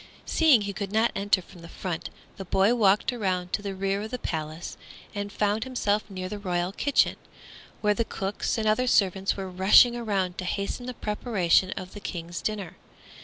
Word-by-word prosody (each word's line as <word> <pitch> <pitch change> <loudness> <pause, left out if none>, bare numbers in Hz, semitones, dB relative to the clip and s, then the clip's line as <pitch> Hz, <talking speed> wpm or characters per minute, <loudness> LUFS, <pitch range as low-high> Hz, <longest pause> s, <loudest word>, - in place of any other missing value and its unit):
Seeing 305 -9 +5
he 200 0 -3
could 195 -1 -4
not 220 +2 +3
enter 200 -2 +2
from 175 0 -15
the 170 - -11
front, 175 -2 -4 0.3
the 195 - -5
boy 195 +5 +3
walked 210 +1 +3
around 185 -6 -2
to - - 0
the 200 -1 -4
rear 195 +1 -1
of 215 - -5
the 250 - -3
palace 160 -5 -5 0.4
and 205 0 -4
found 210 +2 0
himself 215 -5 0
near 185 -2 -5
the 205 +2 -6
royal 180 -2 -1
kitchen, 280 +7 +2 0.6
where 210 -1 +3
the 230 - 0
cooks 195 0 -3
and 220 -1 0
other 250 +4 +2
servants 195 -4 +2
were 195 -1 -4
rushing 190 +6 +6
around 195 -6 -1
to 185 - -3
hasten 200 +6 -3
the 250 - -5
preparation 210 -5 +1
of 185 0 -7
the 205 - -8
King's 170 -3 -5
dinner. 195 -5 -4
200 Hz, 190 wpm, -27 LUFS, 185-215 Hz, 0.6 s, rushing